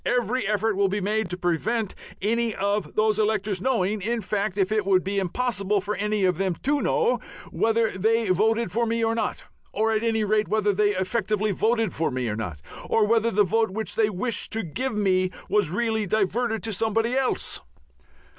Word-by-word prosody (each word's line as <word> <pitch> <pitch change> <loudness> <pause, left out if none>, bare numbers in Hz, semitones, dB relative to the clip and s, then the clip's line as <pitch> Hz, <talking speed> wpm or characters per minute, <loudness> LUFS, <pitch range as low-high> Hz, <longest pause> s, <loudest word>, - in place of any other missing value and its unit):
_Every 245 -2 0
effort 215 0 +1
will 200 0 +2
be 200 +2 -1
made 210 0 -1
to 180 - -3
prevent 190 +5 -1 0.3
any 230 +1 0
of 200 +1 -1
those 215 0 +2
electors 210 -3 0
knowing 215 -4 0
in 230 +4 -1
fact, 200 0 -2
it 205 +2 +1
would 190 -1 +3
be 195 +1 -1
impossible 200 0 0
for 205 +2 -3
any 210 -1 0
of 180 -2 +1
them 190 -3 0
to 290 +2 +2
know 465 +1 +1 0.3
whether 225 -1 +1
they 220 +2 +1
voted 220 +3 +2
for 230 +4 0
me 230 0 0
or 225 - +1
not, 230 - -2 0.3
or 220 +1 +2
at 220 -1 +1
any 225 -1 +1
rate 210 +1 +1
whether 210 -1 +1
they 205 +1 +2
effectively 210 +2 0
voted 225 +3 +1
for 165 - 0
me 125 -2 -2
or 105 - -2
not, 90 -10 -5 0.3
or 220 - +3
whether 230 +1 +3
the 210 -1 +3
vote 220 +3 +1
which 215 +3 -3
they 220 -1 +3
wished 210 +3 -2
to 225 0 0
give 240 - -3
to - - -4
me 185 -2 +2 0.2
was 210 -7 +2
really 220 +2 0
diverted 220 +3 0
to 225 -1 -2
somebody 225 +3 0
else_." 260 0 -1
215 Hz, 195 wpm, -25 LUFS, 195-225 Hz, 0.3 s, would